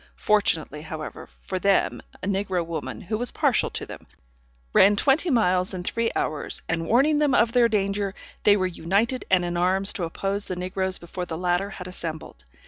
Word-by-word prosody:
Fortunately, 165 -8 +1
however, 155 0 -7
for 185 - -3
them, 200 +1 +2 0.2
a - - -2
negro 190 -3 -1
woman, 165 -1 -5
who 215 +4 -3
was 245 0 +1
partial - - +1
to - - -4
them, - - -11 0.7
ran 205 +2 +6
twenty 280 - +2
miles 185 - +2
in 180 - -5
three 230 +5 0
hours, 150 - -2
and 165 0 -1
warning 285 - +4
them 295 -3 +3
of 230 -1 +4
their 240 -1 +4
danger, 200 -1 -1 0.3
they 205 0 +5
were 185 - 0
united 200 +8 0
and 180 -2 +3
in 175 0 -3
arms 190 +3 +1
to 205 -5 -4
oppose 195 +4 -1
the 185 - -3
negroes 185 +1 -1
before 180 +1 -6
the 160 - -4
latter 180 +3 0
had 185 -2 -8
assembled. 160 - -6
190 Hz, 185 wpm, -25 LUFS, 175-210 Hz, 0.7 s, ran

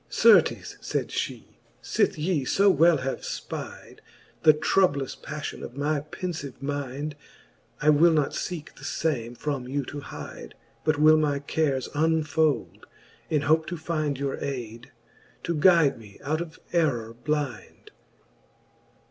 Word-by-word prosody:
XIX. - - -6
Certes, - - +4
fayd - - -2
ftie, - - -3 0.4
fith - - +1
ye 155 -2 0
fo 195 +9 +4
well 165 0 +5
have 135 - -2
fpide - - -7 0.4
The 155 - +8
troublous 150 -3 +1
pafHon - - -6
of 120 - -8
my 145 +1 0
penfive 150 -2 -6
mind, 145 +1 -4 0.7
I 150 - +6
will 155 +4 +6
not 150 -3 +2
feeke 170 -4 -5
the - - -14
fame 135 -4 -2
from 135 -2 -3
you 140 +1 -2
to 145 - -6
hide, - - -9 0.3
But 155 0 +2
will 155 +1 +6
my 150 -2 +1
cares 140 -2 -1
unfolde, 155 -2 0 0.4
in 150 -2 +2
hope 155 +2 +3
to 175 +2 -4
find 155 -3 -2
Your 140 0 -3
aide, 120 -2 -6 0.5
to 170 - -1
guide 160 -4 +4
me 105 -3 -14
out 155 +3 -1
of 165 -2 -7 0.2
errour 125 -10 +1
blind. 130 -3 -4
150 Hz, 140 wpm, -26 LUFS, 135-160 Hz, 0.7 s, The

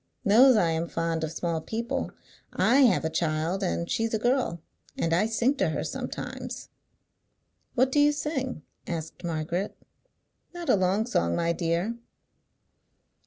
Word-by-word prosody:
Knows 250 +6 +7
I 170 -6 +3
am 165 +1 -1
fond 165 -1 -2
of 155 - -2
small 165 -1 -2
people. 230 +6 -3 0.4
I 245 +4 +3
have 245 -12 +4
a - - +1
child, 160 +3 -1
and 175 -2 -1
she's 225 +3 0
a - - +2
girl, 240 -7 0 0.4
and 165 - 0
I 185 +6 +3
sing 235 +4 +2
to 190 -7 +2
her 155 - -2
sometimes." - - -6 1.1
"What 260 +1 +3
do 290 - +3
you 290 0 +6
sing?" 275 - -3 0.2
asked 160 0 -5
Margaret. 170 +4 -2 0.8
"Not 345 -1 -5
a - - +6
long 190 +3 +1
song, 85 - 0
my 170 0 +1
dear. 175 +7 -1
185 Hz, 150 wpm, -27 LUFS, 165-235 Hz, 1.1 s, Knows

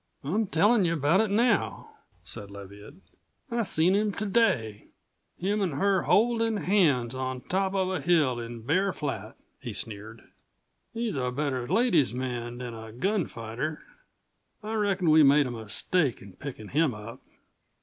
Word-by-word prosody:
"I'm 200 +10 0
tellin' 205 +6 +3
you 170 -1 +1
about 165 +5 +3
it 220 - 0
now," 225 +2 +1 0.3
said 100 - -7
Leviatt. 100 +6 -11 0.6
"I 235 0 +1
seen 180 -3 +2
him 210 +1 +2
to 215 - -3
day; 135 - +1 0.5
him 205 +3 -1
an' 185 -6 0
her 190 +6 +2
holdin' 225 0 +2
hands 155 - +2
on 130 -1 -4
top 190 +4 -1
of 190 -1 +1
a 185 - -2
hill 150 -6 +2
in 115 -1 -7
Bear 185 - +1
Flat." 145 -3 -5 0.2
He - - -6
sneered. 110 +1 -4 0.7
"He's 230 -8 -3
a 125 -1 0
better 130 -2 -2
ladies' 175 - +2
man 120 -2 -4
than 125 -1 -6
a 110 -1 -9
gunfighter. 150 - -3 0.8
I 215 +1 -4
reckon 195 -6 +1
we 155 +1 +7
made 145 0 +6
a 125 - -4
mistake 120 - -1
in 100 -1 -13
pickin' 125 -5 -8
him 150 -4 +1
up." 105 +2 -10
150 Hz, 155 wpm, -27 LUFS, 120-195 Hz, 0.8 s, we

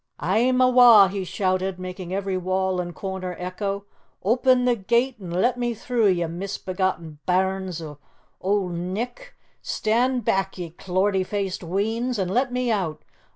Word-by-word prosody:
"A'm 230 - +2
awa'!" 245 -6 +8
he 195 0 -3
shouted, 185 0 -1
making 185 -1 -7
every 195 0 -2
wall 185 0 0
and 175 -1 -7
corner 190 -2 -4
echo. 195 +2 -4 0.4
"Open 250 +4 +3
the 245 -1 +3
gate 235 +5 +1
an' 180 - -7
let 230 +9 +1
me 240 -1 -1
through, 230 0 +1
ye 175 -3 +2
misbegotten 180 -2 -3
bairns 185 -2 0
o' 150 -2 -9 0.4
Auld 195 -1 0
Nick! 210 - -5 0.3
Stand 240 +2 0
back, 195 0 0
ye 175 -3 -6
clortie 190 +3 0
faced 195 -1 -3
weans, 220 +7 -1
an' 190 -3 -1
let 250 +6 +1
me 250 -1 0
out! 180 -8 -2
195 Hz, 150 wpm, -24 LUFS, 185-230 Hz, 0.4 s, awa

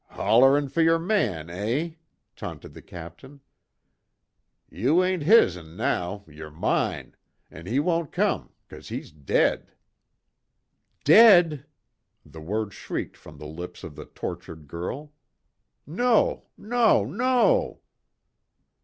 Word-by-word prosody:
"Hollerin' 135 +4 +3
fer 165 - 0
yer 165 0 +4
man, 120 - -1
eh," 115 - -2 0.4
taunted - - -9
the - - -12
Captain, 85 - -12 1.3
"Ye 115 +8 -3
ain't 185 -2 -1
his'n 90 - +3
now, 95 +3 -2
yer 75 0 -11
mine 75 +2 -2 0.4
an' 85 +3 -11
he 125 +6 0
won't 165 -1 -1
come - - -1 0.2
cause - - -12
he's - - -7
dead 75 -2 -1 0.6
" - - -49
"Dead!" 170 - +6 0.6
The 80 - -12
word 105 +4 -3
shrieked - - -6
from 75 - -15
the 75 - -10
lips 85 +4 -9
of 75 - -9
the 75 - -9
tortured 80 -3 -8
girl, 130 - -6 0.7
"No, 230 +8 +1
no, 225 - +2
no!" 255 - +1
125 Hz, 115 wpm, -25 LUFS, -, 1.3 s, Dead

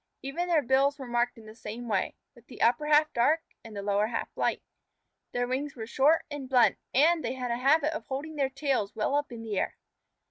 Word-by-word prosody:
Even 315 +7 -3
their 325 -4 +3
bills 270 +3 +3
were 270 - -7
marked 240 0 0
in 225 - -13
the 215 - -11
same 225 +2 -7
way, 200 -4 -1 0.2
with 235 0 -20
the - - -4
upper 300 +6 +3
half 300 0 +4
dark 295 +7 +3 0.2
and 225 -2 -11
the 200 - -4
lower 205 +1 +1
half 230 0 -4
light. - - 0 0.7
Their 245 0 -1
wings 275 +3 -3
were 225 -3 -6
short 280 +7 +3
and 280 -3 -6
blunt, 250 -3 +4
and 315 +5 +4
they 240 +1 -2
had 250 -2 -3
a 235 - 0
habit 300 +4 +3
of 315 - -6
holding 290 +4 -5
their 275 -2 +1
tails 265 -7 -1
well 220 +5 0
up 290 -1 0
in 230 -1 -7
the 210 -3 -2
air. - - -2
260 Hz, 225 wpm, -28 LUFS, 235-290 Hz, 0.7 s, half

